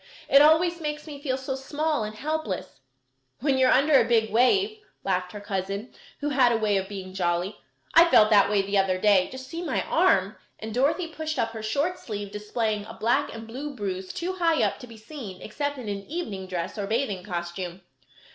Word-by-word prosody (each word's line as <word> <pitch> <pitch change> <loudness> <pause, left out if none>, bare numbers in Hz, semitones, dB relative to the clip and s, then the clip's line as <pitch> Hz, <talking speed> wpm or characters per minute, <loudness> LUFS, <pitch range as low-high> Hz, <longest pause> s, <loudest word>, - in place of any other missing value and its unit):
"It 275 - +7
always 330 +3 +4
makes 300 -1 -4
me 290 -3 -9
feel 260 -3 -1
so 265 0 -4
small 290 +1 -1
and 215 0 -5
helpless." 290 - -4 0.6
"When 270 0 +1
you 260 - +5
are - - +4
under 275 0 +5
a 230 - -1
big 220 -2 +3
wave," 390 - +3 0.2
laughed 180 -1 -1
her 205 - -7
cousin, 200 +2 -4 0.3
who 295 - 0
had 260 -4 +4
a 230 - +2
way 215 -2 +1
of 190 0 -3
being 190 -2 -7
jolly. 180 +2 -1 0.4
"I 335 +1 +8
felt 215 -8 +6
that 200 -2 +6
way 205 -1 +2
the 200 0 +1
other 190 -1 +2
day. 195 -1 +4
Just 260 0 -8
see 330 +4 -5
my - - -1
arm," - - +2 0.2
and 220 0 -7
Dorothy 280 +8 +1
pushed 315 -1 -4
up 230 -2 0
her 225 -1 -7
short 285 +12 -1
sleeve, 205 -3 -6
displaying 210 0 -2
a 225 +1 -10
black 230 +2 +1
and 225 0 -8
blue 275 +6 -6
bruise 190 -4 -4
too 360 +2 -3
high 335 -3 +2
up - - 0
to 250 - -10
be 230 -1 -12
seen 220 -5 -9
except 285 +6 -3
in 250 -4 -7
an 200 -1 -4
evening 220 - -5
dress 180 +3 -4
or 200 - -2
bathing 215 -4 -1
costume. 175 0 -5
225 Hz, 210 wpm, -26 LUFS, 200-290 Hz, 0.6 s, I